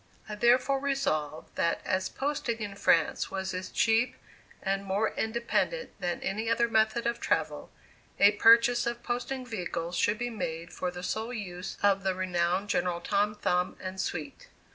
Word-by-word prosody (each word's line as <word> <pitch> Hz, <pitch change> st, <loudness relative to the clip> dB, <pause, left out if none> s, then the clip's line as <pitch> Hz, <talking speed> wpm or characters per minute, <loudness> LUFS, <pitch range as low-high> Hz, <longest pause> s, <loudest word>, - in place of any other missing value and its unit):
I 215 Hz, -, -6 dB
therefore 250 Hz, +5 st, +3 dB
resolved 160 Hz, -, -2 dB
that 170 Hz, -, +1 dB
as 185 Hz, 0 st, 0 dB
posting 275 Hz, -5 st, -2 dB
in 210 Hz, -3 st, -5 dB
France 170 Hz, -5 st, +2 dB
was 190 Hz, 0 st, -3 dB
as 185 Hz, 0 st, -4 dB
cheap, 225 Hz, +2 st, +2 dB, 0.5 s
and 195 Hz, 0 st, 0 dB
more 200 Hz, +3 st, 0 dB
independent 235 Hz, -, -1 dB
than 175 Hz, -1 st, -2 dB
any 220 Hz, +3 st, -2 dB
other 235 Hz, +1 st, +3 dB
method 220 Hz, +1 st, +2 dB
of 235 Hz, 0 st, 0 dB
travel, -, -, -1 dB, 0.5 s
a 200 Hz, +1 st, +7 dB
purchase 230 Hz, +3 st, +5 dB
of 235 Hz, 0 st, -3 dB
posting 255 Hz, +2 st, -3 dB
vehicles 175 Hz, -6 st, -4 dB
should 205 Hz, +4 st, +2 dB
be 245 Hz, +1 st, -3 dB
made 165 Hz, -6 st, -5 dB
for 180 Hz, -, -2 dB
the 180 Hz, 0 st, -8 dB
sole 220 Hz, +5 st, -2 dB
use 185 Hz, -5 st, -6 dB
of 200 Hz, -1 st, +4 dB
the 190 Hz, -1 st, 0 dB
renowned 180 Hz, +1 st, 0 dB
General 175 Hz, -3 st, 0 dB
Tom 205 Hz, +3 st, 0 dB
Thumb 180 Hz, -3 st, 0 dB
and 185 Hz, 0 st, -4 dB
suite. 150 Hz, -5 st, -5 dB
205 Hz, 165 wpm, -29 LUFS, 180-235 Hz, 0.5 s, a